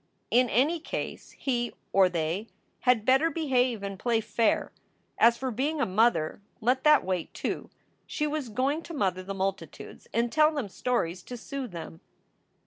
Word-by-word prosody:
In 250 0 +4
any 285 +10 +2
case 315 - -5
he 240 -3 -1 0.2
(or 190 -1 +6
they) 170 +5 -2 0.3
had 250 -4 +2
better 270 +5 +4
behave 255 - +1
and 195 -1 -5
play 235 -2 +1
fair! 225 0 +1 0.5
As 235 +1 +6
for 260 0 -3
being 285 +7 -1
a 280 - +2
mother, 205 -4 +2 0.2
let 250 +4 +1
that 300 -6 +6
wait, 185 -3 -2
too. - - -3 0.4
She 300 - -1
was 300 -4 -2
going 270 +8 0
to 335 0 -8
mother 185 -8 0
the 195 +1 -6
multitudes 190 -4 -5
and 235 +1 0
tell 310 +2 +5
them 255 -9 -2
stories 185 -6 -1
to 245 +6 -8
soothe 270 -1 -6
them. 165 -1 -8
240 Hz, 165 wpm, -28 LUFS, 195-270 Hz, 0.5 s, or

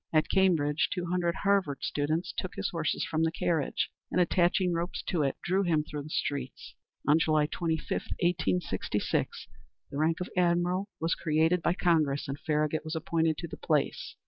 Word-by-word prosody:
At 155 -1 +2
Cambridge, 165 -6 +3
two 180 -2 -2
hundred 175 -1 +1
Harvard 195 -8 +1
students 155 +5 -1
took 185 - -4
his 200 0 -2
horses 165 -4 -1
from 160 0 -1
the 165 0 +2
carriage, 160 -3 -1 0.2
and - - 0
attaching 180 +1 +3
ropes 170 +2 -2
to 175 -5 0
it, 135 -2 0
drew 190 +3 +2
him 165 -5 +2
through 150 -1 -6
the 145 - -9
streets. 140 -4 -3 0.3
On 150 +3 +5
July 155 -2 +3
25, 160 +1 -2 0.3
1866, 130 - -1 0.4
the 140 - -5
rank 160 +1 +2
of 180 - -4
admiral 180 +2 +2
was 165 +1 +1
created 160 +3 +2
by 170 - +2
Congress, 155 -6 +2
and 135 +1 -4
Farragut 155 0 0
was 160 +1 -4
appointed 160 -1 0
to 170 - -5
the - - -8
place. 150 -4 -1
165 Hz, 170 wpm, -29 LUFS, 150-175 Hz, 0.4 s, On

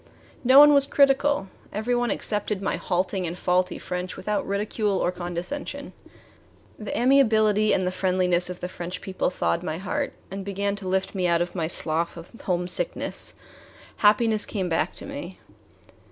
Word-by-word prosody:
No 260 +2 +6
one 295 +1 +10
was 280 -1 +5
critical. 280 -5 +3 0.2
Every 220 +4 -1
one 240 0 +1
accepted 210 -1 -1
my 195 - -1
halting 185 0 -1
and 170 +2 -5
faulty 180 +1 +1
French 180 0 -5
without 210 +2 -2
ridicule 205 0 -1
or 180 - +1
condescension. 180 +11 -5 0.9
The 210 - -3
amiability 220 -5 +4
and 185 - +2
the 180 - 0
friendliness 180 -1 +1
of 180 - -7
the 180 - -2
French 180 0 -6
people 190 -1 -1
thawed 85 - -1
my 155 - -3
heart 185 +1 -3 0.2
and 195 0 -5
began 200 +1 -2
to 195 -2 -7
lift 190 +1 -1
me 185 -3 0
out 170 -1 +3
of 175 - -8
my 165 -4 -1
slough 165 0 -1
of 165 +1 -11
homesickness. 180 - -2 0.6
Happiness 215 +1 +3
came 190 -4 -2
back 165 +1 0
to - - -7
me. 280 -10 -7
190 Hz, 165 wpm, -25 LUFS, 180-220 Hz, 0.9 s, one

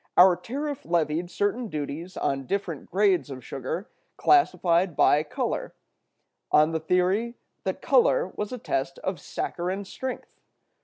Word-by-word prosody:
Our 180 0 +8
tariff 285 +7 -4
levied 170 0 0
certain 205 +6 -1
duties 155 +2 -5
on 135 -1 -1
different 190 -7 -3
grades 190 -4 +2
of 130 -4 -8
sugar 160 - -4 0.3
classified 180 - +3
by 145 - +5
color, 155 - -3 0.8
on 155 +1 +5
the 160 - -1
theory 185 +8 +1 0.3
that - - -3
color - - +4
was 210 - -3
a 250 - -4
test 335 - -2
of - - -2
saccharine 190 - -3
strength. 260 +6 -6
180 Hz, 135 wpm, -26 LUFS, 160-230 Hz, 0.8 s, Our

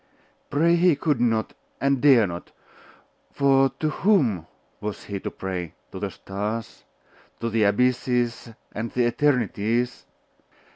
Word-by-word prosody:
Pray 170 +4 +3
he 175 -2 +4
could 145 -4 0
not, 115 -3 +1 0.3
and 140 -2 +1
dare 130 -7 +6
not; 85 -2 -7 0.8
for 135 -1 +4
to 155 -1 0
whom 145 - +2 0.3
was 105 0 -5
he 100 -1 -5
to - - -4
pray? 90 -4 -5 0.2
To 95 - -7
the 100 +1 -2
stars? 105 +4 -5 0.5
to 115 0 -2
the 115 0 +1
Abysses 125 +2 +1 0.2
and 115 +2 -4
the 125 -1 +2
Eternities?.... 120 -2 0
120 Hz, 130 wpm, -24 LUFS, 105-140 Hz, 0.8 s, dare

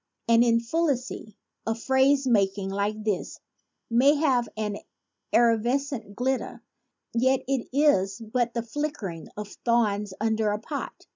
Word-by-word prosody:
An 230 0 +5
infelicity 240 - 0 0.3
of 225 0 0
phrasemaking 240 -7 +2
like 205 +2 -2
this 210 -4 -2 0.5
may 260 +5 +4
have 265 -6 +1
an 210 -1 -2 0.5
evanescent 235 0 +1
glitter, 260 +3 -2 0.5
yet 260 +2 +2
it 270 -2 -1
is 250 -9 +2
but 235 +2 -1
the 235 - -1
flickering 230 - -4
of 210 -1 -5
thorns 210 -4 +1
under 220 0 +1
a 210 - -2
pot. 280 +6 -6
230 Hz, 120 wpm, -26 LUFS, 210-265 Hz, 0.5 s, An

